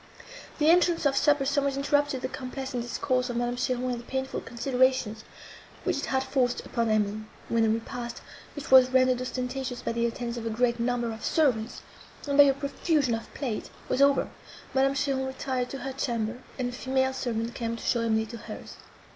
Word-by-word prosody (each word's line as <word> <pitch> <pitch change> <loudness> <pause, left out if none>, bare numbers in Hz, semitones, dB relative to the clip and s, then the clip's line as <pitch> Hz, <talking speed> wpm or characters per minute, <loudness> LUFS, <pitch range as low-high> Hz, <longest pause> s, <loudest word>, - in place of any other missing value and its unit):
The 310 +1 +5
entrance 345 -2 +3
of 275 -1 +3
supper 290 0 +3
somewhat 280 0 +1
interrupted 285 -1 +1
the - - 0
complacent 260 -1 -5
discourse 250 +1 -1
of 240 - -2
Madame 240 0 0
Cheron 250 0 -1
and 240 - -3
the 235 - -12
painful 265 +1 -3
considerations, 245 -2 0 0.6
which - - 0
it - - -3
had 265 0 +1
forced 260 -2 0
upon 230 -2 -1
Emily. 210 -1 +1 0.3
When 230 - +2
the 225 - +4
repast, 230 +2 -3 0.4
which 290 -3 -7
was 260 -1 +8
rendered 255 -1 +3
ostentatious 255 0 -4
by - - -1
the 235 0 +1
attendance 235 0 -4
of 230 -1 -4
a - - 0
great 235 +1 +1
number 240 -1 0
of 220 0 -8
servants, 250 -7 +1 0.4
and 280 - 0
by 285 0 +9
a 275 - +4
profusion 280 -1 0
of 225 0 -4
plate, 245 -7 -3 0.2
was 265 - +1
over, 280 0 +4 0.4
Madame 270 +1 +3
Cheron 270 -1 0
retired 260 -1 -2
to 275 - -5
her 270 0 -5
chamber, 235 -3 -2 0.2
and 250 -2 -1
a - - -6
female 265 +1 0
servant 235 -3 -2
came 230 -1 -3
to 230 - -9
show 235 - +1
Emily 220 -1 +1
to 235 +2 -8
hers. 225 - -9
255 Hz, 195 wpm, -28 LUFS, 235-270 Hz, 0.6 s, by